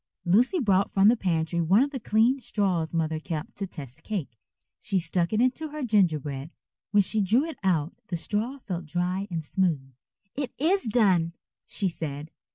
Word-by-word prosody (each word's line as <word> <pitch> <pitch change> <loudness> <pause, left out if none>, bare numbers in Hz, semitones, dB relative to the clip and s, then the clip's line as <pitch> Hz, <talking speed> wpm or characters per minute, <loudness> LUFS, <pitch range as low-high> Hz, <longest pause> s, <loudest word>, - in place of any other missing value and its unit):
Lucy 235 - +3
brought 200 -6 +2
from 195 +1 +5
the 235 - +5
pantry 170 -4 0
one 190 +9 +4
of 285 - -3
the 265 - -4
clean 225 +4 +2
straws 185 -9 -1
Mother 160 -1 -1
kept 155 -1 -5
to 200 - -3
test 145 -4 -10
cake. 160 - -5 0.4
She 200 -5 -1
stuck 170 0 0
it 215 - +1
into 255 +6 +1
her 300 -1 -6
gingerbread. 155 - +1 0.4
When 205 +1 +4
she 215 +3 0
drew 220 +8 +3
it 325 - -7
out 170 -5 +1
the 175 - -2
straw 220 +10 -2
felt 180 - -5
dry 180 +4 -1
and 165 -3 -3
smooth. 150 -5 -1 0.4
"It 275 -3 -4
is 350 +6 +2
done," 190 -7 +3 0.3
she 195 - 0
said. 155 -3 -5
190 Hz, 175 wpm, -27 LUFS, 165-220 Hz, 0.4 s, from